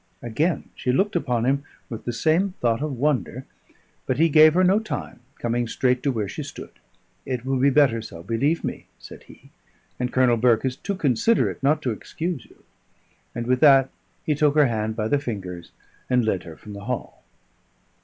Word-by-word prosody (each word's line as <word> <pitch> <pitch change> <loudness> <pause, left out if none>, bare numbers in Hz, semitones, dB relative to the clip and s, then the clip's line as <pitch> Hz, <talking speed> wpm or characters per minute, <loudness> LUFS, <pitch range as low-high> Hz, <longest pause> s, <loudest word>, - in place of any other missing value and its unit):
Again 140 +8 -1
she 125 - -1
looked 200 +10 +1
upon 120 -2 0
him 140 +2 +1 0.2
with 115 - -8
the 120 - -1
same 165 - +1
thought 115 +1 +1
of 150 -4 -3
wonder; 130 -1 -1 0.6
but 130 - 0
he 165 +2 +4
gave 155 +1 +6
her 185 - +4
no 190 +3 +4
time, 220 - -6 0.2
coming 120 0 -1
straight 125 +2 +1
to 140 - +1
where 110 -5 -2
she - - -6
stood. - - -9 0.5
"It 125 -1 -4
will 135 -1 0
be 140 +2 +4
better 135 -5 +3
so, 85 -6 -10
believe 130 - 0
me," - - -5
said - - -12
he; - - -17 0.5
"and 125 0 -2
Colonel 125 -2 +3
Burke 120 +1 +3
is 130 -1 -1
too 200 - -4
considerate 160 - +1
not 150 +3 +2
to 125 - 0
excuse 160 - -5
you." - - -22 0.7
And 120 - -3
with 125 +1 +1
that 135 -2 +6 0.3
he 155 - +2
took 150 0 +2
her 150 -1 +6
hand 110 -3 -1
by 110 -1 -1
the 145 +4 +2
fingers, 95 -10 -6 0.4
and 125 -2 +2
led 100 -4 -1
her 80 -2 -10
from 105 - -11
the 100 0 -9
hall. 125 0 -5
130 Hz, 195 wpm, -23 LUFS, 115-150 Hz, 0.7 s, gave